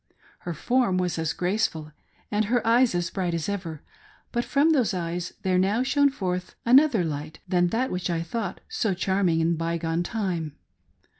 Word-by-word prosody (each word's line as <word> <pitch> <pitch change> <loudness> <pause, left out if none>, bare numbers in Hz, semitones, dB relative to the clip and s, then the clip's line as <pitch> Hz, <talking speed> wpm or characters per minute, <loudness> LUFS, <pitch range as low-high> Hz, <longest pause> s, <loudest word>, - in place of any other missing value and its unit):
Her 175 -2 -5
form 240 +1 +1
was 180 -2 -1
as 160 -2 0
graceful, 180 -5 -1 0.4
and 210 +1 +1
her 240 +2 +1
eyes 235 -2 +4
as 175 -1 -1
bright 180 -3 -1
as 165 - -2
ever; 180 -7 -4 0.5
but 240 - 0
from 290 +5 +3
those 250 -10 +2
eyes 175 0 -3
there 185 -1 +2
now 205 +6 +2
shone 280 +2 +3
forth 185 -8 -3
another 250 -4 +5
light 155 0 -4
than 175 -1 +2
that 240 +8 -1
which 180 0 -2
I 170 - 0
had 165 - -3
thought 200 0 -4
so 230 - -1
charming 185 -3 +1
in 165 +1 +2
the 170 - 0
by 165 +1 -1
gone 165 +1 -1
time. 175 -6 -3
185 Hz, 190 wpm, -26 LUFS, 170-230 Hz, 0.5 s, another